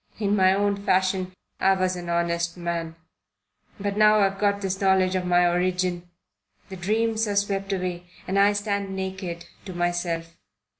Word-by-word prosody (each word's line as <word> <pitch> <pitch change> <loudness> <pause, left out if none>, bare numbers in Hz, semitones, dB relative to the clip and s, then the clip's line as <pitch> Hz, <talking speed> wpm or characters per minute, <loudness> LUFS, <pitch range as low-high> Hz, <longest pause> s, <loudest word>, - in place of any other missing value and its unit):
In 205 -1 +1
my 190 -1 +4
own 200 0 0
fashion 185 -1 +1 0.3
I 195 - +4
was 185 -1 0
an 175 -1 -6
honest 170 0 -1
man. 170 -1 -3 0.8
But 200 0 -2
now 215 0 +6
I've 195 0 +1
got 200 0 +1
this 190 0 -3
knowledge 190 -1 +3
of 185 -1 -1
my 175 0 +4
origin, 180 0 0 0.6
the 190 - -7
dreams 220 +4 0
are 205 - -2
swept 200 -1 0
away 180 -2 -3 0.2
and 195 +1 +1
I 200 +1 +5
stand 200 -1 -2
naked 190 -2 -5 0.2
to 190 - -7
myself. 175 -1 -2
190 Hz, 160 wpm, -25 LUFS, 175-200 Hz, 0.8 s, now